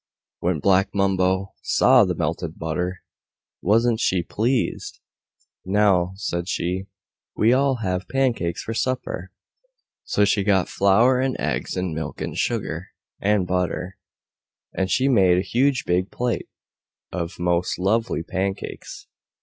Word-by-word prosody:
When 90 -1 0
Black 95 +5 +2
Mumbo 95 0 +1
saw 125 -3 +5
the 90 -1 -1
melted 80 +1 -3
butter, 90 +3 -3 0.6
wasn't 115 +3 +2
she 90 -6 +1
pleased! 120 +8 -1 0.6
"Now," 95 -2 +2
said 90 -3 -3
she, 95 +2 -2 0.5
"we'll 120 +4 +4
all 140 -1 +2
have 90 -1 -2
pancakes 120 -11 0
for 115 - -4
supper!" 130 +2 -2 0.7
So 105 - +2
she 100 0 +2
got 95 -2 +2
flour 115 +7 +4
and 130 0 -1
eggs - - -2
and 90 -2 -2
milk 80 +1 -5
and - - -4
sugar 95 -6 -2 0.3
and 100 -2 +2
butter, 90 +1 -2 0.7
and 95 0 -1
she 130 +5 +2
made 95 -9 +4
a - - +2
huge 130 +5 +1
big 90 +2 +1
plate 125 -1 -2 0.6
of 85 -2 -4
most 90 0 0
lovely 110 0 0
pancakes. 95 +2 -4
95 Hz, 130 wpm, -23 LUFS, 90-115 Hz, 0.7 s, saw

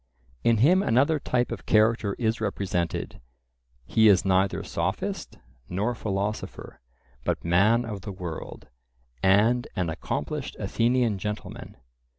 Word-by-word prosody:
In 115 -1 +4
him 170 - +5
another 145 - +2
type 125 -2 0
of - - -6
character 110 -2 +3
is 110 -2 -1
represented; 95 -4 -2 0.6
he 110 - +4
is 100 -3 +5
neither 95 0 +2
sophist - - -3 0.3
nor 105 +7 -1
philosopher, 105 - -4 0.4
but - - -2
man 105 +8 +3
of 105 -3 -6
the 100 - -6
world, 90 -4 -7 0.5
and 110 +6 +3
an 90 -3 -1
accomplished 130 - -4
Athenian 115 +1 +1
gentleman. 105 +1 -6
105 Hz, 120 wpm, -26 LUFS, 95-120 Hz, 0.6 s, him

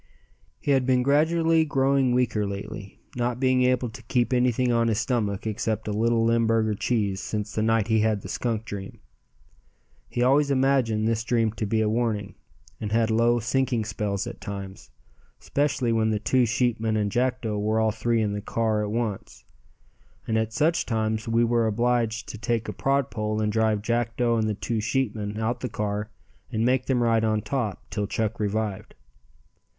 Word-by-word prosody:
He 145 - -1
had 130 -2 +2
been 125 -1 +3
gradually 160 +3 +3
growing 135 -3 +2
weaker 110 -4 +1
lately, 100 0 -7 0.2
not 120 0 -1
being 130 -1 +3
able 125 -1 +2
to 125 +3 -11
keep 120 +2 0
anything 125 0 +2
on 115 -1 +2
his 110 -2 +1
stomach 105 -5 -1
except 110 0 -2
a - - -1
little 115 +1 +2
Limburger 115 -1 +2
cheese 100 -3 -1
since 105 -1 -4
the 110 - -1
night 115 -1 +2
he 110 -1 +3
had 110 -2 +1
the - - -7
skunk 115 -2 -2
dream. 100 -3 -7 1.1
He 120 - 0
always 140 +3 +4
imagined 130 -5 +2
this 115 0 0
dream 115 -2 +1
to 110 -1 -4
be 110 +2 +1
a 110 - +2
warning, 110 -3 -1 0.5
and 105 - -4
had 115 0 +2
low 120 +2 +3
sinking 120 0 0
spells 100 -3 -2
at - - -8
times, 100 -2 -7 0.5
specially 140 -4 0
when 110 -1 +2
the 110 - +1
two 120 +4 +2
sheepmen 115 -2 0
and 105 -1 0
Jackdo 125 -3 0
were 110 +2 +1
all 110 0 +2
three 115 +1 0
in 105 -1 -1
the 105 - -3
car 110 0 0
in 105 - 0
at 105 - -4
once, 110 -5 -4 0.8
and 110 - 0
at 110 0 0
such 160 +8 +1
times 110 -1 -1
we 115 +1 +2
were 115 -1 +2
obliged 115 0 0
to 110 - -7
take 115 -1 -1
a - - -4
prod 140 0 0
pole 110 -1 -2
and 105 -1 0
drive 110 -1 +1
Jackdo 115 0 0
and 110 0 0
the 105 - -1
two 110 +2 -2
sheepmen 110 -3 -2
out 120 +2 -1
the 125 - -4
car 105 0 -3 0.4
and 110 +1 0
make 130 +1 +1
them 125 -3 +2
ride 115 -1 +2
on 110 -1 +1
top 120 -8 -3
till 105 -1 -2
Chuck 110 +1 -2
revived. 105 -1 -2
115 Hz, 185 wpm, -25 LUFS, 110-125 Hz, 1.1 s, always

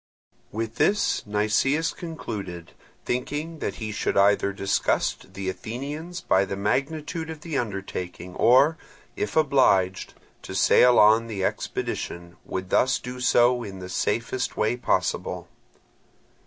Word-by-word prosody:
With 115 +2 -4
this 205 +1 +2
Nicias 110 +10 +1
concluded, 100 - -6 0.3
thinking 150 +6 -3
that - - -3
he 110 -2 -5
should 105 - -1
either 100 0 +4
disgust 100 -1 -1
the 95 0 -5
Athenians 140 - -5
by 95 - +3
the 95 0 -4
magnitude 150 - -2
of 160 -2 -7
the 160 -1 -5
undertaking, 95 -4 -5
or, 140 - +4 0.4
if - - -3
obliged 130 -11 +2 0.3
to - - -8
sail 125 -1 +5
on 110 +2 +6
the 100 -4 -2
expedition, 85 -2 -4
would 95 0 -5
thus 125 -1 +3
do 125 +1 -7
so 120 0 +4
in 100 -4 -7
the 90 -1 -8
safest 115 +6 -1
way 110 +3 +1
possible. 125 - -1
115 Hz, 130 wpm, -25 LUFS, 95-140 Hz, 0.4 s, on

